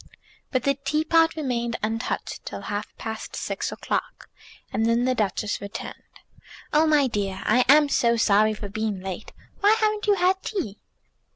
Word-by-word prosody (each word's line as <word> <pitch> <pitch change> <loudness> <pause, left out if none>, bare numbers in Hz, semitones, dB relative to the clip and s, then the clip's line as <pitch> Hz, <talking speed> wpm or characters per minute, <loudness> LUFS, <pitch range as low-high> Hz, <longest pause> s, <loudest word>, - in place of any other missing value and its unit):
But 255 -2 0
the 280 - +3
teapot 315 +4 +2
remained 240 -6 -2
untouched 225 +2 -3
till - - -7
past 215 +2 -5
six - - -3
o'clock, - - -4 0.4
and 225 - +1
then 235 +1 +2
the 255 - +2
Duchess 210 -2 -1
returned. 200 0 -6 0.8
"Oh, 310 +2 +5
my 300 -2 +4
dear, 200 -6 -2
I 245 +4 +4
am 295 +1 +7
so 235 -4 +2
sorry 215 0 +4
for 210 -1 -6
being 210 -1 -3
late. 190 +2 -6 0.3
Why 410 +2 +5
haven't 430 -1 0
you 410 - +5
had 375 +1 +2
tea?" 315 - -4
235 Hz, 155 wpm, -25 LUFS, 215-305 Hz, 0.8 s, am